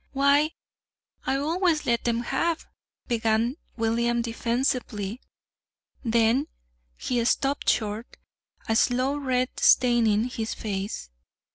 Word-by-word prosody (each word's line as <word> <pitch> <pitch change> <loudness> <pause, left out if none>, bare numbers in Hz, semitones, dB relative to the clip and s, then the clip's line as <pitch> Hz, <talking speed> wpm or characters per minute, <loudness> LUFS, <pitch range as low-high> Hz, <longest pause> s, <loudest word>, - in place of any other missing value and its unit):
"Why, 280 +2 +4 0.8
I 265 - +2
always 320 +3 +1
let 235 -1 +1
them 235 0 +1
have 330 +7 -1 0.2
" - - -48
began 230 +2 +1 0.2
William 235 +1 +1
defensively; 230 -2 -2 0.8
then 235 +4 +2 0.5
he 245 -2 -1
stopped 275 +4 +1
short, 215 +1 -1 0.5
a 225 - +1
slow 255 +4 +2
red 255 -3 0
staining 235 -4 +4
his 230 -2 -3
face. 195 - -4
240 Hz, 105 wpm, -26 LUFS, 225-270 Hz, 0.8 s, Why